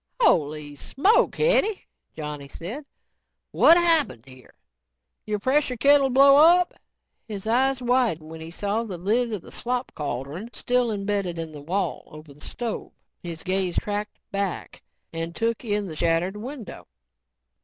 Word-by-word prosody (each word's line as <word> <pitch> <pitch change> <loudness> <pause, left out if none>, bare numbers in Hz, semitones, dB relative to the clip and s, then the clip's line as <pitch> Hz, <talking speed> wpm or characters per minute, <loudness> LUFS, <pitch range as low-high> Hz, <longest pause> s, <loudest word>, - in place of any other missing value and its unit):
"Holy 150 - +1
smoke, 335 - +2
Hetty," 455 -3 +2 0.3
Johnny 150 -2 -6
said. 210 - -7 0.7
"What 335 - +6
happened 320 - +2
here? 130 -2 -16 0.7
Your 210 0 0
pressure 260 +3 +1
kettle 275 +2 +5
blow 275 +2 +6
up?" 345 +4 +6 0.5
His 205 -3 -7
eyes 255 +3 +1
widened 235 -11 +1
when 160 0 -9
he 160 - -7
saw 205 +5 -2
the 195 -6 -6
lid 225 +7 0
of 210 -5 -4
the - - -13
slop 250 +1 -3
cauldron 145 - -5
still 245 -1 0
embedded 200 -4 -2
in 165 -1 -5
the 150 -2 -10
wall 180 +3 -2
over 155 -1 -13
the 145 - -20
stove. 240 -2 -5 0.3
His 165 -2 -6
gaze 185 -2 0
tracked 210 0 -3
back 195 -3 -4 0.3
and 165 0 -4
took 230 +5 -1
in 210 -2 -1
the 165 -5 -7
shattered 170 +4 0
window. 240 +2 -8
205 Hz, 145 wpm, -24 LUFS, 165-250 Hz, 0.7 s, What